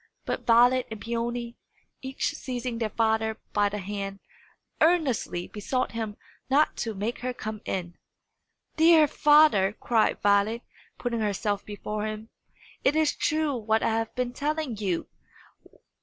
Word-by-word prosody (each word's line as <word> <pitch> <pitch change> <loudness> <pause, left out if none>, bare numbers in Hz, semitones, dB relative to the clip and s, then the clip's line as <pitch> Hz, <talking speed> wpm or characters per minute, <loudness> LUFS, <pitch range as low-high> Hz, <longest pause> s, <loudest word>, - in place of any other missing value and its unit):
But - - -4
Violet 245 +2 +5
and 220 -1 -7
Peony, 235 +1 -3 0.4
each 265 0 -2
seizing 245 -2 -4
their 225 -2 -1
father 220 0 0 0.2
by 205 -1 +3
the 210 - -4
hand, 195 0 -5 0.6
earnestly 290 - +1
besought 255 +5 -2
him 220 -2 -4 0.3
not 290 +3 +3
to 225 -2 -3
make 210 +5 -3
her 250 0 -3
come 215 -2 -6
in. 175 -2 -4 0.8
"Dear 320 -1 +6
father," 295 -11 +5
cried 225 -3 +2
Violet, 205 +3 +3 0.3
putting 240 -2 -2
herself 205 -1 -1
before 210 +1 -4
him, 215 +1 -6 0.5
"it 285 - +3
is 315 -1 +2
true 310 -2 0
what 220 -1 0
I - - +2
have 225 0 -2
been 250 -1 -2
telling 295 -2 -2
you! 195 -5 -2
230 Hz, 140 wpm, -27 LUFS, 210-255 Hz, 0.8 s, Dear